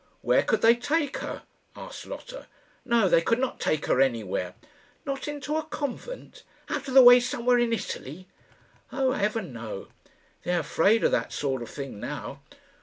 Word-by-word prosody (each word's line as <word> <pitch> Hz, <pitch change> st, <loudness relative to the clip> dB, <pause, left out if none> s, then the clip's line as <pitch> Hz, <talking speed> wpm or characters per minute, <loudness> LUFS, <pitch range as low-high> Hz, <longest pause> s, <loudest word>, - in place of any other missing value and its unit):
"Where -, -, +3 dB
could -, -, 0 dB
they 230 Hz, +1 st, +7 dB
take 285 Hz, +4 st, -1 dB
her?" -, -, -6 dB, 0.3 s
asked -, -, -9 dB
Lotta. -, -, -9 dB, 0.4 s
"No; 235 Hz, -4 st, +3 dB
they 170 Hz, -, +4 dB
could 230 Hz, +7 st, +1 dB
not 260 Hz, 0 st, -2 dB
take 155 Hz, -1 st, 0 dB
her 130 Hz, -, +2 dB
anywhere." 105 Hz, -8 st, -1 dB, 0.5 s
"Not 275 Hz, 0 st, -4 dB
into 295 Hz, +1 st, -3 dB
a 315 Hz, -, -1 dB
convent 310 Hz, -, -6 dB, 0.3 s
out 280 Hz, -2 st, -3 dB
of 265 Hz, -, -4 dB
the 265 Hz, -, +10 dB
way 245 Hz, 0 st, +10 dB
somewhere 245 Hz, 0 st, +1 dB
in 240 Hz, -1 st, +1 dB
Italy?" 185 Hz, -, -5 dB, 0.6 s
"Oh, 265 Hz, -1 st, +1 dB
heaven, 210 Hz, -, -1 dB
no! 110 Hz, -4 st, -7 dB, 0.5 s
They 180 Hz, -, -1 dB
are 170 Hz, -, +1 dB
afraid 200 Hz, +8 st, +2 dB
of -, -, +3 dB
that -, -, 0 dB
sort 135 Hz, -3 st, -2 dB
of 120 Hz, -, -7 dB
thing 135 Hz, -7 st, -7 dB
now. -, -, -6 dB
230 Hz, 175 wpm, -26 LUFS, -, 0.6 s, the